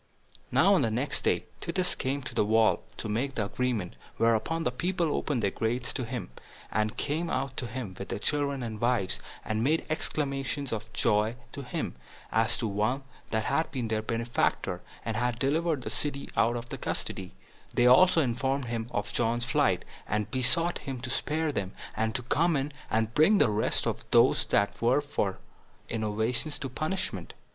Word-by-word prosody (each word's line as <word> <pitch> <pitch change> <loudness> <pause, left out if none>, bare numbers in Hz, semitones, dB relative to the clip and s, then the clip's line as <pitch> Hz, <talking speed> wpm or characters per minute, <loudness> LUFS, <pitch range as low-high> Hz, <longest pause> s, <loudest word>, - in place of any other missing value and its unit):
5. - - -17
Now 200 - +6
on 185 - +4
the 115 - +2
next 125 +6 0
day - - +2
Titus 180 +1 0
came 140 +1 -2
to 130 - -6
the - - +3
wall, 110 +1 +4 0.2
to - - -4
make 125 +6 -1
the 105 - 0
agreement; 115 -5 -2 0.2
whereupon 115 +9 +2
the - - +1
people 170 +4 0
opened 130 -7 -1
their 100 - +2
gates 120 +2 -1
to 130 - -2
him, 120 - -5 0.4
and 110 0 0
came 160 +4 -1
out 130 -1 -1
to 125 - -2
him, 115 -5 -5
with 95 - -6
their - - -2
children 140 +2 0
and 110 -2 -5
wives, 120 -6 +1 0.3
and 110 +1 0
made 155 +5 +2
acclamations 140 -3 -1
of 110 0 -5
joy 110 0 +2 0.2
to 140 - -6
him, 125 -2 -3 0.4
as 115 +1 +2
to 115 - -1
one 110 +7 0 0.3
that 110 -1 0
had 160 +5 +1
been 125 -5 -3
their 110 0 +1
benefactor, 115 +2 0 0.2
and 115 -1 -1
had 120 0 0
delivered 150 +2 +1
the - - -4
city 140 -2 -2
out 120 +1 +3
of 120 0 -4
custody; 95 -1 -3 0.4
they 120 - +3
also 160 +6 +7
informed 135 +2 0
him 115 -1 -3
of 105 -3 -3
John's 120 +1 +1
flight, 135 -9 +2 0.2
and 105 0 -1
besought 130 +7 +2
him 135 -3 -5
to 125 -1 -4
spare 155 +3 0
them, 100 -7 -3 0.2
and 110 0 0
to 125 - -1
come 165 +7 +2
in, 140 +2 -2 0.2
and 110 0 +1
bring 175 - +6
the 115 - +4
rest 105 +1 +1
of - - -2
those - - +5
that 100 - +1
were 125 +5 +4
for 125 -9 -1 0.5
innovations 110 +6 -1
to 135 - -4
punishment. 155 +9 -2
125 Hz, 185 wpm, -29 LUFS, 110-140 Hz, 0.5 s, also